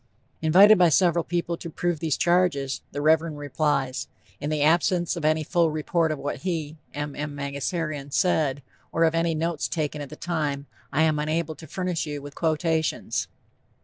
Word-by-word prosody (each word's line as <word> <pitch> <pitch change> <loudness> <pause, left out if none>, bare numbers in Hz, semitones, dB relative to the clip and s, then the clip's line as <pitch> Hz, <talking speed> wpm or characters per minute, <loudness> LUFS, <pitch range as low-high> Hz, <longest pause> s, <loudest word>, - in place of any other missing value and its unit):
Invited 190 +6 +7
by 175 -2 +6
several 170 0 +3
people 170 0 -2
to 170 - -7
prove 175 0 -1
these 160 -3 0
charges, 170 -6 +1
the 145 +1 -4
Reverend 160 0 +3
replies: 145 -3 -1 0.3
"In 145 - -3
the 155 -1 0
absence 170 +3 +2
of 170 - -5
any 155 +1 +2
full 170 +1 +2
report 155 +1 0
of 155 - -2
what 140 +1 -4
he 160 -4 -3 0.2
(M. 145 -1 -5
M. 150 0 -4
Mangasarian) 140 +1 -3
said, 145 -4 +1 0.3
or 165 - +2
of 165 -1 +3
any 165 0 +1
notes 165 0 -1
taken 150 -2 -2
at 145 - -7
the 155 - -9
time, 150 -5 -2 0.3
I 150 +3 +2
am 155 -2 +2
unable 155 +1 -1
to 160 +2 -12
furnish 180 -4 -2
you 145 -1 -4
with 145 0 -10
quotations." 160 0 0
155 Hz, 180 wpm, -25 LUFS, 145-170 Hz, 0.3 s, Invited